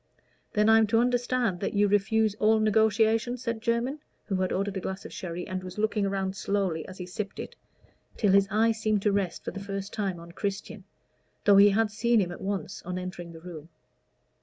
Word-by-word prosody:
"Then 210 0 +3
I'm 220 0 +6
to 225 +2 +2
understand 245 -4 +1
that 200 - -3
you 205 0 +4
refuse 205 +1 +2
all 220 +1 +4
negotiation?" 220 +2 +2
said 235 -2 -4
Jermyn, 235 +5 0 0.3
who 195 - -1
had 185 0 0
ordered 200 +1 -1
a - - -1
glass 190 +1 -5
of - - -9
sherry, 175 -1 -5
and 185 0 -4
was 185 +1 -8
looking 210 -1 +1
around 195 -1 -2
slowly 195 -6 -1
as 185 - -10
he 180 - -6
sipped 195 +3 -6
it, - - -7 0.6
till 205 -4 +3
his 195 0 +5
eyes 220 +2 +2
seemed 215 -2 +1
to 210 - +3
rest 195 -3 -1
for - - -3
the 200 - -7
first 195 0 -5
time 195 -5 -2
on 170 0 -11
Christian, 200 +1 -5 0.6
though 200 -1 +7
he 200 +1 +8
had 215 +1 +1
seen 235 +2 +2
him 180 -3 0
at 175 - -9
once 195 0 -4
on 180 +1 -5
entering 180 -2 -6
the 165 -1 -12
room. 165 -2 -9
200 Hz, 210 wpm, -28 LUFS, 190-220 Hz, 0.6 s, he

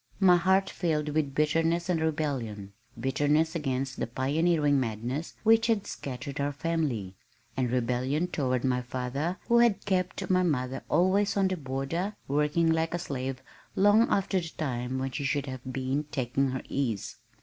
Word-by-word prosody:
My 185 -3 +6
heart 190 +2 +3
filled 155 -5 -1
with 145 -2 -1
bitterness 165 +3 +1
and 175 -3 +1
rebellion, 130 -11 -2 0.3
bitterness 145 +5 +1
against 135 -4 -2
the - - -1
pioneering 145 +3 +2
madness 125 +6 -3
which 225 +1 +5
had 220 -4 +1
scattered 140 +1 -6
our 145 +1 0
family, 145 - -2 0.4
and 130 -2 0
rebellion 125 +6 0
toward 130 -7 -1
my 125 -1 +1
father 130 +8 -3
who 235 0 +5
had 225 -4 +3
kept 185 -1 -1
my 185 0 +3
mother 135 -7 -1
always 195 +3 +2
on 195 -1 +3
the 185 - 0
border, 155 +7 -3
working 150 +4 +2
like 160 +1 0
a - - 0
slave 130 -5 -4 0.3
long 205 +4 +5
after 195 -1 +1
the 165 -2 -5
time 130 -5 -3
when 135 0 -2
she 140 - -4
should 140 0 0
have 130 -2 -6
been 135 +3 -1
taking 135 -1 -1
her 130 0 -4
ease. 120 -7 -2
145 Hz, 160 wpm, -28 LUFS, 130-175 Hz, 0.4 s, My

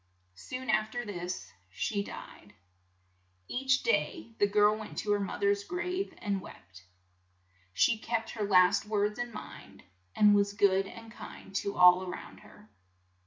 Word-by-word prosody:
Soon 255 - -5
af 215 0 +1
ter 245 +1 -4
this 175 - -5 0.2
she 200 - -2
died. - - -11 0.9
Each 260 +1 +1
day 335 - 0
the 205 - +4
girl 210 +1 +4
went 215 -1 -9
to 210 - -1
her 205 - +3
moth 200 0 -4
er's 200 0 +2
grave 360 - -3
and 200 -2 -2
wept. 95 - -14 0.9
She 215 - +2
kept 225 0 -2
her 215 - -3
last 200 0 +4
words 210 +1 0
in 240 0 -3
mind, 215 - -11 0.3
and 210 -1 +6
was 200 0 +2
good 195 -1 +3
and 225 +2 -11
kind 195 -3 -11
to 200 - -2
all 180 0 +7
a 185 - -5
round - - -8
her. 110 - -18
205 Hz, 160 wpm, -30 LUFS, 190-225 Hz, 0.9 s, all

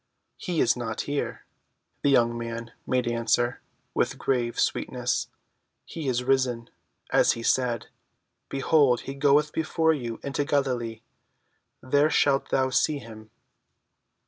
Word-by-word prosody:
"He 175 -3 -1
is 115 - +3
not 115 -3 -3
here," 145 0 -3 0.6
the 145 - +2
young 120 -3 +3
man 115 0 -5 0.2
made 125 -1 +1
answer, 120 +1 0 0.3
with - - 0
grave 120 -3 -1
sweetness. - - 0 0.6
"He 160 -4 -6
is 125 -1 0
risen, 125 -3 0 0.4
as - - +4
he 115 - -7
said. 125 -1 +1 0.6
Behold 135 -2 +3
he 135 - -6
goeth 145 +2 +3
before 160 0 +1
you 120 -6 -5
into 140 +1 -1
Galilee; 125 -6 -1 0.8
there 145 +3 +3
shalt 140 -3 +2
thou 130 -1 +1
see 145 +3 +2
him." 110 -4 -11
130 Hz, 125 wpm, -26 LUFS, 120-140 Hz, 0.8 s, as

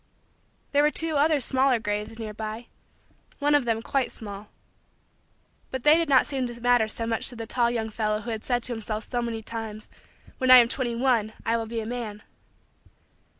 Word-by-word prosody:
There 285 - +4
were 300 - +4
two 320 +1 -1
other 300 +1 +3
smaller 260 0 +2
graves 210 0 -3
nearby 220 +1 -6 0.7
one 290 0 +2
of 290 -4 +3
them 225 -1 -1
quite 270 -1 0
small 205 -1 -9 1.2
but 260 -2 -5
they 300 +1 +7
did 330 -2 +1
not 265 -2 +5
seem 265 -3 -2
to 240 0 -8
matter 245 -2 +3
so 225 +1 -5
much 225 -1 -1
to 250 - -9
the 230 -1 -6
tall 235 +1 +1
young 225 -2 -2
fellow 215 -1 -1
who 235 +2 -5
had 220 -1 -4
said 245 -2 0
to 245 - -1
himself 220 -1 -4
so 245 -1 -2
many 230 -2 -4
times: 220 -1 -6 0.5
"when 260 - +1
I 255 - +11
am 235 -1 +6
twenty 240 -2 -2
one, 230 -3 +1
I 230 - +2
will 225 -1 -2
be 230 0 -3
a - - -6
man." 220 -3 -5
235 Hz, 195 wpm, -26 LUFS, 220-255 Hz, 1.2 s, I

